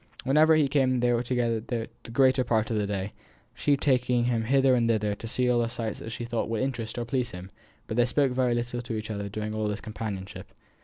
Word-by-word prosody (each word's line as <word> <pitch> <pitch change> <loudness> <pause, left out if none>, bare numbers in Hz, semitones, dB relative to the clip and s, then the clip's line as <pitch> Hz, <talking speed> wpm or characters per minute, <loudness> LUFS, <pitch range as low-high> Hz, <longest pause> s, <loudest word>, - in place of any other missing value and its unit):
Whenever 155 +4 +5
he 155 -2 +3
came 130 -2 +2
they 120 0 +2
were 120 - +1
together 120 -2 0
the 115 0 -4 0.2
greater 130 +1 +4
part 110 -2 0
of 110 - 0
the 105 -1 0
day; 100 0 -3 0.4
she 145 -1 +1
taking 125 -3 +2
him 115 -2 0
hither 135 +1 +4
and 120 -2 +2
thither 105 -2 +1
to 115 - -7
see 125 +2 0
all 125 -1 +3
the 115 -1 0
sights 115 -3 -4
that 115 - -7
she 120 - -5
thought 115 -2 -2
would 115 +2 -1
interest 120 -4 -3
or 120 - -2
please 125 0 -1
him; 90 -2 -9 0.3
but 110 - -4
they 120 - +5
spoke 135 +2 +1
very 125 -1 +1
little 120 0 -2
to 120 -1 -5
each 110 0 -4
other 100 -1 -4
during 110 +1 -4
all 110 -1 -1
this 105 0 -2
companionship. 105 -3 -6
120 Hz, 240 wpm, -27 LUFS, 110-125 Hz, 0.4 s, Whenever